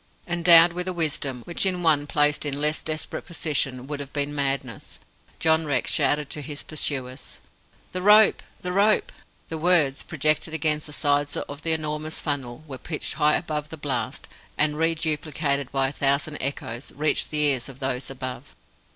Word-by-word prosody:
Endowed 170 Hz, -1 st, +6 dB
with 180 Hz, +1 st, -4 dB
a 185 Hz, -, -2 dB
wisdom, 145 Hz, -7 st, -2 dB
which 170 Hz, -, 0 dB
in 180 Hz, -2 st, +1 dB
one 150 Hz, -3 st, +3 dB
placed 150 Hz, 0 st, +2 dB
in 145 Hz, -1 st, -1 dB
less 150 Hz, +1 st, +1 dB
desperate 155 Hz, 0 st, -4 dB
position 140 Hz, -6 st, -2 dB
would 145 Hz, +1 st, -5 dB
have 140 Hz, -1 st, -7 dB
been 145 Hz, 0 st, -2 dB
madness, 135 Hz, -4 st, -3 dB, 0.4 s
John 160 Hz, -1 st, +3 dB
Rex 135 Hz, -4 st, 0 dB
shouted 150 Hz, 0 st, +2 dB
to 150 Hz, -, -4 dB
his 145 Hz, 0 st, -6 dB
pursuers. 135 Hz, -4 st, -3 dB, 0.5 s
"The 185 Hz, -, -4 dB
rope! 210 Hz, +2 st, +6 dB, 0.2 s
the 180 Hz, -, -3 dB
rope!" 205 Hz, +3 st, +3 dB, 0.4 s
The 160 Hz, -, -4 dB
words, 155 Hz, -5 st, +3 dB
projected 155 Hz, +1 st, 0 dB
against 155 Hz, -1 st, 0 dB
the -, -, -11 dB
sides 145 Hz, -1 st, 0 dB
of 145 Hz, +1 st, -6 dB
the 165 Hz, 0 st, +1 dB
enormous 155 Hz, 0 st, -3 dB
funnel, 140 Hz, -2 st, -4 dB
were 135 Hz, -3 st, -8 dB
pitched 155 Hz, -3 st, -2 dB
high 150 Hz, 0 st, +3 dB
above 150 Hz, -3 st, -3 dB
the 160 Hz, -, -8 dB
blast, 145 Hz, -2 st, -3 dB, 0.3 s
and, 150 Hz, -1 st, +2 dB
reduplicated 155 Hz, -3 st, -1 dB
by 135 Hz, -1 st, +1 dB
a -, -, -9 dB
thousand 140 Hz, +2 st, 0 dB
echoes, 130 Hz, -2 st, -4 dB
reached 150 Hz, +1 st, +1 dB
the 155 Hz, -, -3 dB
ears 135 Hz, -3 st, +1 dB
of 135 Hz, -1 st, -12 dB
those 130 Hz, -1 st, -2 dB
above. 130 Hz, 0 st, -7 dB
150 Hz, 170 wpm, -24 LUFS, 140-160 Hz, 0.5 s, Endowed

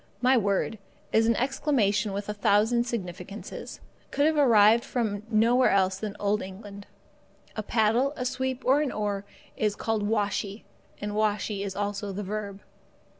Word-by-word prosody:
My 255 Hz, +2 st, +4 dB
word, 205 Hz, -1 st, 0 dB, 0.3 s
as 225 Hz, 0 st, +4 dB
an 230 Hz, -, +3 dB
exclamation 230 Hz, -6 st, +1 dB
with 200 Hz, +1 st, -4 dB
a 210 Hz, -, -2 dB
thousand 215 Hz, +4 st, +2 dB
significances, 195 Hz, -3 st, -6 dB, 0.3 s
could 285 Hz, -, +1 dB
have 315 Hz, 0 st, +3 dB
arrived 230 Hz, -5 st, +5 dB
from 215 Hz, -5 st, -2 dB
nowhere 235 Hz, +3 st, +4 dB
else 190 Hz, -1 st, +2 dB
than 210 Hz, -2 st, -5 dB
Old 205 Hz, +1 st, +1 dB
England. 200 Hz, +1 st, -9 dB, 0.7 s
A 215 Hz, -, -2 dB
paddle, 225 Hz, +5 st, +2 dB
a 250 Hz, -, -4 dB
sweep, 260 Hz, 0 st, -2 dB
or 270 Hz, +3 st, +4 dB
an 290 Hz, -4 st, -1 dB
oar, 205 Hz, -1 st, -2 dB, 0.3 s
is 210 Hz, -1 st, 0 dB
called 225 Hz, 0 st, -1 dB
washee, 205 Hz, 0 st, -1 dB, 0.4 s
and 205 Hz, 0 st, -4 dB
washee 210 Hz, -1 st, 0 dB
is 195 Hz, -1 st, -5 dB
also 205 Hz, 0 st, -3 dB
the 200 Hz, +2 st, -4 dB
verb. 200 Hz, 0 st, -5 dB
210 Hz, 155 wpm, -27 LUFS, 200-235 Hz, 0.7 s, arrived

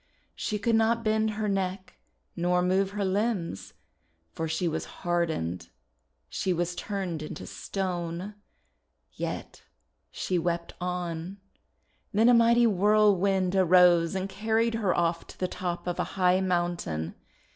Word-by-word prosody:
She 210 Hz, -, -2 dB
could 230 Hz, +3 st, 0 dB
not 225 Hz, +1 st, +2 dB
bend 220 Hz, 0 st, +2 dB
her 215 Hz, 0 st, -2 dB
neck 190 Hz, -1 st, -3 dB, 0.4 s
nor 180 Hz, +1 st, +1 dB
move 190 Hz, +2 st, +2 dB
her 200 Hz, 0 st, -2 dB
limbs, 185 Hz, -, -2 dB, 0.6 s
for 160 Hz, -, -3 dB
she 160 Hz, +3 st, -1 dB
was 160 Hz, 0 st, -2 dB, 0.2 s
hard 175 Hz, -1 st, +2 dB
ened; 85 Hz, -, -4 dB, 0.6 s
she 185 Hz, -, -1 dB
was 175 Hz, +1 st, -1 dB
turned 185 Hz, -4 st, -4 dB
into 155 Hz, -, -7 dB
stone. 180 Hz, 0 st, -4 dB, 0.8 s
Yet -, -, -5 dB, 0.5 s
she 180 Hz, -2 st, -1 dB
wept 170 Hz, 0 st, -2 dB
on. 180 Hz, 0 st, -3 dB, 0.8 s
Then 225 Hz, +3 st, +5 dB
a -, -, +7 dB
mighty 235 Hz, 0 st, +5 dB
whirlwind 195 Hz, -2 st, +3 dB
arose 180 Hz, -2 st, +5 dB
and 190 Hz, 0 st, -1 dB
carried 220 Hz, +4 st, 0 dB
her 215 Hz, -5 st, 0 dB
off 170 Hz, 0 st, 0 dB
to -, -, -13 dB
the 185 Hz, -, 0 dB
top 180 Hz, -1 st, -4 dB
of 175 Hz, -1 st, -3 dB
a -, -, +2 dB
high 185 Hz, 0 st, +4 dB
mountain. 175 Hz, -, -1 dB
185 Hz, 135 wpm, -28 LUFS, 175-205 Hz, 0.8 s, a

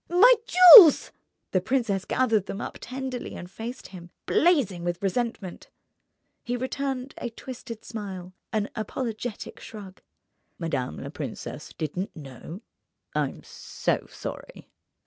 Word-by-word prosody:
"My 395 Hz, +9 st, +7 dB
jewels!" 360 Hz, -1 st, +10 dB, 0.4 s
The 185 Hz, -, +1 dB
princess 215 Hz, -4 st, -1 dB
gathered 225 Hz, -6 st, +1 dB
them 200 Hz, -, -5 dB
up -, -, -7 dB
tenderly 255 Hz, -1 st, -6 dB
and 175 Hz, +1 st, -9 dB
faced 235 Hz, +5 st, -8 dB
him, 175 Hz, -2 st, -11 dB, 0.2 s
blazing 270 Hz, -, +2 dB
with 175 Hz, +2 st, -3 dB
resentment. 205 Hz, -2 st, -3 dB, 0.7 s
He 245 Hz, +1 st, -3 dB
returned 265 Hz, +1 st, -4 dB
a 240 Hz, -, -4 dB
twisted 230 Hz, -1 st, -9 dB
smile, 190 Hz, -5 st, -7 dB, 0.2 s
an 215 Hz, -2 st, -1 dB
apologetic 225 Hz, 0 st, -5 dB
shrug. 200 Hz, -3 st, -11 dB, 0.6 s
"Madame 130 Hz, -, -3 dB
la -, -, -7 dB
princesse -, -, -7 dB
didn't 175 Hz, +6 st, -5 dB
know? 155 Hz, -, -10 dB, 0.5 s
I'm -, -, -2 dB
so -, -, -3 dB
sorry." -, -, -9 dB
225 Hz, 120 wpm, -26 LUFS, 185-260 Hz, 0.7 s, jewels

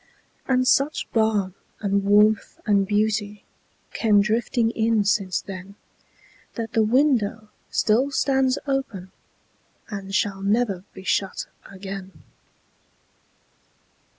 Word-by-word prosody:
And 255 Hz, -1 st, +2 dB
such 280 Hz, +4 st, +2 dB
balm 215 Hz, -4 st, +1 dB, 0.3 s
and 200 Hz, -1 st, 0 dB
warmth 210 Hz, +1 st, +3 dB
and 200 Hz, -3 st, +2 dB
beautyCame 210 Hz, 0 st, -1 dB
drifting 225 Hz, +2 st, +1 dB
in 225 Hz, -2 st, +1 dB
since 195 Hz, -2 st, 0 dB
then, 195 Hz, +1 st, -9 dB, 0.8 s
That 230 Hz, -2 st, -5 dB
the 225 Hz, -, +3 dB
window 220 Hz, -3 st, +1 dB, 0.2 s
still 240 Hz, +6 st, +2 dB
stands 265 Hz, -1 st, +1 dB
openAnd 200 Hz, -4 st, -7 dB
shall 200 Hz, -2 st, 0 dB
never 200 Hz, -2 st, 0 dB
be 190 Hz, -, -10 dB
shut 190 Hz, 0 st, -1 dB, 0.2 s
again. 195 Hz, -2 st, -9 dB
210 Hz, 95 wpm, -23 LUFS, 195-230 Hz, 0.8 s, warmth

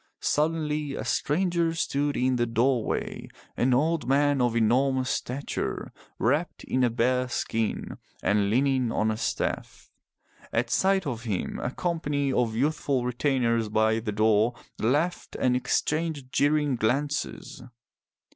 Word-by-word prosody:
Suddenly 150 Hz, -2 st, 0 dB
a -, -, -5 dB
stranger 170 Hz, +1 st, +1 dB
stood 145 Hz, -2 st, 0 dB
in 130 Hz, 0 st, +2 dB
the 120 Hz, 0 st, +1 dB
doorway, 120 Hz, +1 st, 0 dB, 0.3 s
an 130 Hz, -, +2 dB
old 155 Hz, +5 st, +1 dB
man 145 Hz, 0 st, +3 dB
of 120 Hz, -2 st, +1 dB
enormous 130 Hz, +3 st, +2 dB
stature, 135 Hz, +3 st, -3 dB, 0.3 s
wrapped 145 Hz, +9 st, 0 dB
in 130 Hz, -, 0 dB
a 125 Hz, -, +4 dB
bear 125 Hz, +2 st, +1 dB
skin, 115 Hz, -2 st, -2 dB, 0.2 s
and 105 Hz, -1 st, +2 dB
leaning 130 Hz, +1 st, +2 dB
on 110 Hz, -1 st, +1 dB
a -, -, -1 dB
staff. -, -, -3 dB, 0.6 s
At -, -, 0 dB
sight 190 Hz, -1 st, +2 dB
of 120 Hz, -4 st, -4 dB
him 100 Hz, -5 st, -2 dB
a -, -, -2 dB
company 145 Hz, -3 st, -1 dB
of 115 Hz, -3 st, +1 dB
youthful 135 Hz, -1 st, 0 dB
retainers 120 Hz, -3 st, +1 dB
by 110 Hz, +1 st, +2 dB
the 110 Hz, -1 st, -3 dB
door 110 Hz, +2 st, +3 dB, 0.2 s
laughed 150 Hz, +10 st, 0 dB
and 125 Hz, -1 st, +2 dB
exchanged 150 Hz, +1 st, -1 dB
jeering 145 Hz, -2 st, +2 dB
glances. 140 Hz, +7 st, -2 dB
130 Hz, 130 wpm, -27 LUFS, 115-150 Hz, 0.6 s, a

